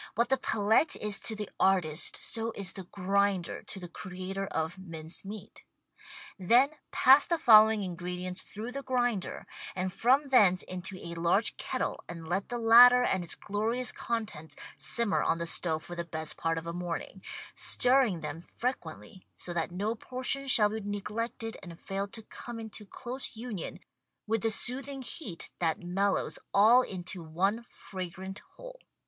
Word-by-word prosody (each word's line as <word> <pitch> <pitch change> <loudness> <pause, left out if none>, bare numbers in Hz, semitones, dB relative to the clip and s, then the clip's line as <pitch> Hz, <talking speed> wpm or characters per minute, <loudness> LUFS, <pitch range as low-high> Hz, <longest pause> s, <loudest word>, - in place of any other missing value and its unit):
What 235 +1 +2
the 265 - +3
palette 220 +5 +2
is 210 -1 -1
to 220 - 0
the 210 -1 -4
artist 180 -5 +2
so 230 0 -2
is 195 -2 -1
the 190 - -8
grinder 195 -1 0
to 195 - -8
the 180 - -7
creator 185 +2 -5
of 160 +3 -3
mince 165 -3 -6
meat. 200 +1 -9 0.8
Then 240 +10 +5 0.2
pass 270 +3 +6
the 340 - +1
following 220 -5 +7
ingredients 180 0 -4
through 220 +4 -7
the 275 +2 -4
grinder, 245 -7 -1 0.3
and 185 0 -2
from 270 +6 +3
thence 195 -8 +5
into 185 +1 -6
a 170 -1 -7
large 170 +6 +2
kettle - - -3
and 165 -2 -7
let 190 +4 -1
the 240 - -2
latter 245 +2 +8
and 190 -6 +1
its 170 - +1
glorious 225 +5 -1
contents 215 -10 -4 0.2
simmer 235 -4 0
on 165 - +1
the 170 - -3
stove 160 -1 +1
for 175 - -8
the 170 - -3
best 160 -2 -2
part 165 0 -1
of 165 - -4
a 170 - -4
morning, 175 +2 -5 0.3
stirring 250 -9 +3
them 165 - -5
fre 240 +7 -2
quently 210 -6 -10
so 175 - -4
that 165 -2 -1
no 200 +5 -1
portion 255 +4 -2
shall 215 -5 +5
be 220 +1 -3
neglected 220 +3 -4
and 170 -2 -10
fail 195 +1 -3
to 220 +2 -10
come 235 +2 -8
into 220 -2 -8
close 255 +4 -6
union 220 -5 -6 0.5
with 225 0 0
the 225 - +1
soothing 265 +4 -1
heat 230 - -5
that 165 0 0
mellows 195 +3 0 0.2
all 220 +5 +7
into 185 -5 -5
one 190 +8 0
fragrant 190 +1 -7 0.2
whole. - - -11
200 Hz, 165 wpm, -30 LUFS, 180-235 Hz, 0.8 s, latter